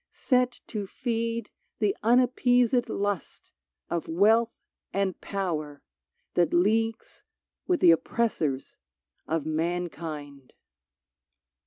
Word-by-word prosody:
set 250 -2 +1
to 205 -3 -5
feed 230 -1 -3 0.3
The 210 -3 +1
unappeas^d 245 0 +3
lust 205 -5 -3 0.4
of 170 -1 -3
wealth 220 +7 +4 0.4
and 195 -1 -1
power 155 -7 -3 0.5
That 175 0 +2
leagues 225 +5 +1 0.5
with 360 -2 +1
the 170 - +8
oppressors 165 - -1 0.5
of 160 -2 -1
mankind 155 -4 -4
200 Hz, 85 wpm, -27 LUFS, 165-230 Hz, 0.5 s, the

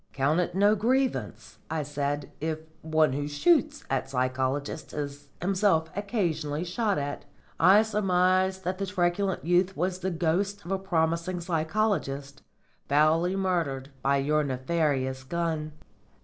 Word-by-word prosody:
"Count 140 +5 +2
it 180 0 -1
no 205 +2 +5
grievance," 215 - -1
I 160 -1 -1
said, 145 0 -3
"if 160 0 -1 0.2
one 155 -3 +2
who 145 +1 -2
shoots 295 - +2
at 135 -1 -1
psychologists 130 +2 -2
is 145 -1 -5
himself 185 -3 +1
occasionally 170 -8 -1
shot 205 +3 0
at. 145 0 -4 0.3
I 200 +4 +7
surmise 190 -3 +2
that 185 +1 -3
the 195 - -2
truculent 185 0 0
youth 180 +2 +2
was 180 +2 -1
the 185 +1 -1
ghost 180 +3 -1
of 175 - -6
a 195 - 0
promising 170 -1 0
psychologist, 160 -5 -1 0.5
foully 160 +5 +3
murdered 165 -8 -1
by 140 +1 +2
your 150 +2 +1
nefarious 130 -1 -1
gun." 160 0 -2
165 Hz, 135 wpm, -27 LUFS, 145-190 Hz, 0.5 s, I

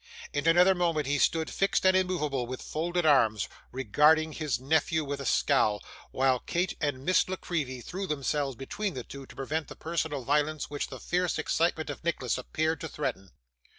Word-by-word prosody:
In 145 +2 -1
another 180 +3 +6
moment, 170 -4 0
he 145 +1 0
stood, 160 +2 +2
fixed 195 -1 +1
and 185 0 +6
immovable 150 -9 0
with 130 +1 -6
folded 175 +2 -1
arms, 110 -9 +4 0.2
regarding 150 +6 +3
his 150 -6 -2
nephew 160 +4 +1
with 140 0 -4
a 135 - -3
scowl; 105 -1 +3 0.3
while 130 -1 +2
Kate 175 +8 -1
and 140 -3 -2
Miss 185 0 +3
La 185 - -1
Creevy 145 -9 -3
threw 190 +8 -5
themselves 140 -2 -1
between 185 - -4
the 125 - -4
two, 135 +1 -10
to - - -14
prevent 155 +4 -3
the - - -9
personal 160 -4 -2
violence 150 +3 0
which 145 - -2
the 130 - -9
fierce 180 +4 0
excitement 160 0 0
of - - -9
Nicholas 130 -8 -1
appeared 155 +4 -1
to - - -3
threaten. 95 0 -4
150 Hz, 185 wpm, -29 LUFS, 135-170 Hz, 0.3 s, another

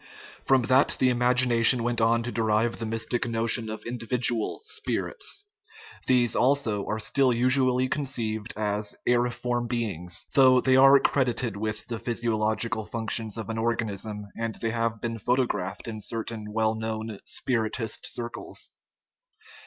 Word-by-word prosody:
From 135 -2 +4
that 130 +3 +3
the 130 - +4
imagination 125 -1 +4
went 120 -1 0
on 115 +1 +3
to 120 - -4
derive 115 0 0
the 115 - -3
mystic 115 +2 -2
notion 115 0 +1
of 110 - -7
individual 120 - -1
" - - -28
spirits"; 435 -1 -2 0.6
these, 120 -3 +3
also, 125 -6 +1
are 110 - -1
still 130 +4 +2
usually 130 +1 +2
conceived 115 -7 -2
as 105 -1 -1
"aeriform 120 0 0
beings 100 -8 -3
" - - -21
though 130 -2 +6
they 130 +1 +3
are 135 +1 +7
credited 125 -5 0
with 110 +1 -4
the 115 -2 -5
physio 115 0 -1
logical 110 +1 -1
functions 110 -1 -1
of 110 -1 -5
an 110 - -3
organism, 110 -2 -2
and 115 -1 -3
they 115 - -3
have 115 -1 -2
been 115 -1 -3
photographed 120 -5 -1
in 110 -2 -6
certain 110 0 -5
well 110 0 +1
known 110 -1 -5
spiritist 115 -2 -2
circles. 120 0 -5
115 Hz, 145 wpm, -26 LUFS, 110-125 Hz, 0.6 s, are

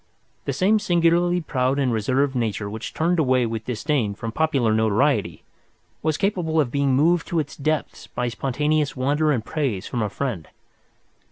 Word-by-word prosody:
The - - -1
same 205 +3 +3
singularly 175 -2 +2
proud 130 -3 0
and 130 -4 +1
reserved 130 +6 +1
nature 110 -4 -1
which 110 +3 -6
turned 170 +2 0
away 130 -4 +3
with 110 -1 -4
disdain 120 -3 -1
from 115 +2 -5
popular 135 -5 +1
notoriety 110 +6 +1 0.6
was 155 -1 0
capable 180 -6 0
of 135 -6 +1
being 140 -1 +1
moved 165 +4 +2
to 170 - -2
its 145 -3 -4
depths 155 +2 -2
by 125 - -3
spontaneous 145 +4 0
wonder 145 +4 +1
and 120 -6 -1
praise 135 -12 -2
from 120 - -3
a 105 - 0
friend. 105 - -4
140 Hz, 165 wpm, -23 LUFS, 120-155 Hz, 0.6 s, same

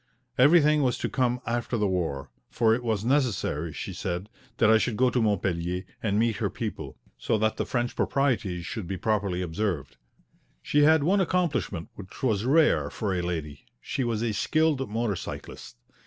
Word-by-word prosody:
Everything 150 +2 +5
was 125 -3 +1
to - - -2
come 125 -2 0
after 120 0 -1
the 105 - +1
war, 85 -9 -2 0.2
for 115 -2 +3
it 125 +2 -1
was 110 -3 -1
necessary, 115 - 0
she - - -6
said, 90 +4 -4 0.3
that - - +4
I 110 0 +6
should 110 -2 -1
go 130 0 +3
to 125 - +1
Montpellier 90 -4 0 0.2
and 105 -2 0
meet 115 -1 +1
her - - -1
people, - - -6 0.2
so - - 0
that 110 +1 0
the - - -2
French 120 -1 -1
proprieties 110 -11 0
should 105 -2 -5
be 95 +1 -3
properly 100 -3 0
observed. 80 -7 -3 0.7
She 145 - +2
had 155 0 +5
one 195 +5 +3
accomplishment 155 - -1
which 95 +3 -12
was 110 -4 +1
rare 155 +4 +3
for 105 -4 -2
a 90 - -1
lady; 80 -5 -5
she 130 - -3
was 115 -2 -1
a 115 -2 0
skilled 145 +4 +1
motor 110 -1 -1
cyclist. - - -8
110 Hz, 180 wpm, -27 LUFS, 90-130 Hz, 0.7 s, I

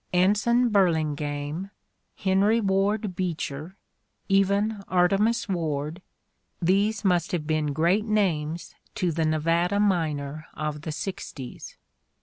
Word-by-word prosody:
Anson 210 +7 +3
Burlingame, 155 -3 0 0.5
Henry 200 +3 +2
"Ward 200 0 0
Beecher, 165 -1 -4 0.5
even 200 +2 +2
Artemus 195 +6 +2
Ward 160 -2 -2 0.3
— - - -48
these 200 +4 +1
must 180 -2 +2
have 165 -4 -1
been 155 -1 0
great 175 +8 +2
names 170 -7 0 0.2
to 180 -2 0
the 160 0 0
Nevada 165 +5 +1
miner 155 -6 0
of 150 -1 -3
the 155 - -4
sixties. 150 -6 -7
180 Hz, 110 wpm, -26 LUFS, 155-200 Hz, 0.5 s, Anson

